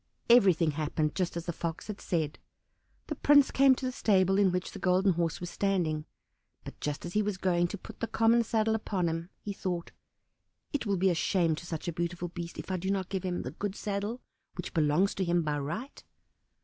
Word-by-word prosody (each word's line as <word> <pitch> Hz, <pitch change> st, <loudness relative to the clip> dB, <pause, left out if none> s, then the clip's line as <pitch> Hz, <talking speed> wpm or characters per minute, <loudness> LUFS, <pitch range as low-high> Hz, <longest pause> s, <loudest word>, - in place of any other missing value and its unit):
Everything 185 Hz, -9 st, +6 dB
happened 150 Hz, 0 st, -1 dB
just 180 Hz, -2 st, -1 dB
as 170 Hz, -, -5 dB
the 175 Hz, -, -2 dB
Fox 165 Hz, 0 st, -4 dB
had 210 Hz, -2 st, -7 dB
said; 155 Hz, -4 st, -1 dB, 0.7 s
the -, -, -3 dB
prince 285 Hz, -1 st, +5 dB
came 270 Hz, -1 st, +6 dB
to 260 Hz, -, -5 dB
the 255 Hz, -, 0 dB
stable 195 Hz, -5 st, +3 dB
in 195 Hz, -2 st, +4 dB
which 180 Hz, +1 st, -2 dB
the -, -, -8 dB
Golden 185 Hz, +1 st, +3 dB
Horse 170 Hz, -1 st, -1 dB
was 175 Hz, 0 st, -6 dB
standing, 170 Hz, -6 st, 0 dB, 0.6 s
but -, -, -10 dB
just 150 Hz, +2 st, -3 dB
as 175 Hz, -, -6 dB
he 210 Hz, -, +3 dB
was 205 Hz, -2 st, -2 dB
going 175 Hz, -2 st, +2 dB
to 205 Hz, -, -6 dB
put -, -, -12 dB
the 230 Hz, -, -1 dB
common 230 Hz, +1 st, +3 dB
saddle 220 Hz, 0 st, +1 dB
upon 200 Hz, -5 st, -1 dB
him, 165 Hz, +1 st, -3 dB
he 205 Hz, -, -3 dB
thought, 180 Hz, -3 st, -3 dB, 0.8 s
"It 280 Hz, -6 st, -1 dB
will 200 Hz, -1 st, +1 dB
be 190 Hz, +1 st, +3 dB
a -, -, +2 dB
shame 170 Hz, -1 st, +2 dB
to 165 Hz, +3 st, -7 dB
such 160 Hz, -1 st, -5 dB
a 170 Hz, -, -1 dB
beautiful 170 Hz, +1 st, -3 dB
beast, 170 Hz, -1 st, -7 dB
if -, -, -6 dB
I 185 Hz, -, 0 dB
do 190 Hz, +2 st, -3 dB
not 195 Hz, -2 st, -1 dB
give 190 Hz, -2 st, -2 dB
him 180 Hz, -1 st, -2 dB
the -, -, -5 dB
good 200 Hz, +4 st, -4 dB
saddle 205 Hz, +4 st, -3 dB, 0.3 s
which -, -, -6 dB
belongs 160 Hz, +4 st, +3 dB
to 190 Hz, -, -1 dB
him 175 Hz, -1 st, +2 dB
by 150 Hz, -1 st, -1 dB
right." 210 Hz, -, -5 dB
185 Hz, 220 wpm, -30 LUFS, 170-205 Hz, 0.8 s, Everything